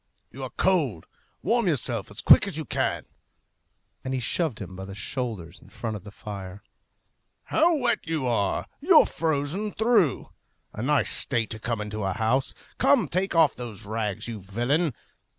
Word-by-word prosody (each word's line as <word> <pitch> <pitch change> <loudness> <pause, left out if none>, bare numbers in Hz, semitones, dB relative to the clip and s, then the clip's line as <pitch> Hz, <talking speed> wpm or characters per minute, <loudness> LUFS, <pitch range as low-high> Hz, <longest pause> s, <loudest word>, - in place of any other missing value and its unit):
You 135 - -9
are 130 - -4
cold. 145 - +1 0.4
Warm 235 -2 +2
yourself 120 - -1
as - - -4
quick - - +8
as - - -4
you - - -3
can," - - -1 1.0
and 130 0 -2
he - - 0
shoved 135 +1 0
him 95 -2 -7
by 95 +1 -7
the 95 0 -8
shoulders 100 -6 -4
in - - -17
front 115 -2 -4
of 105 - -8
the 105 - -9
fire. 100 -2 -8 0.8
"How 330 +1 +3
wet 245 -4 +1
you 160 -5 -1
are! 110 -5 0
You're 325 +2 +6
frozen 160 +6 -1
through! 220 - +2 0.4
A 105 - -5
nice 145 +3 +2
state 115 -4 -1
to 110 - -5
come 115 0 -2
into 105 0 -4
a 95 -1 0
house! 120 +6 0 0.2
Come, 275 -6 +4
take 185 +1 -1
off 165 -3 +5
those 115 -5 -7
rags, 110 -1 -3
you 110 -3 -5
villain!" 120 - 0
120 Hz, 170 wpm, -26 LUFS, 105-165 Hz, 1.0 s, quick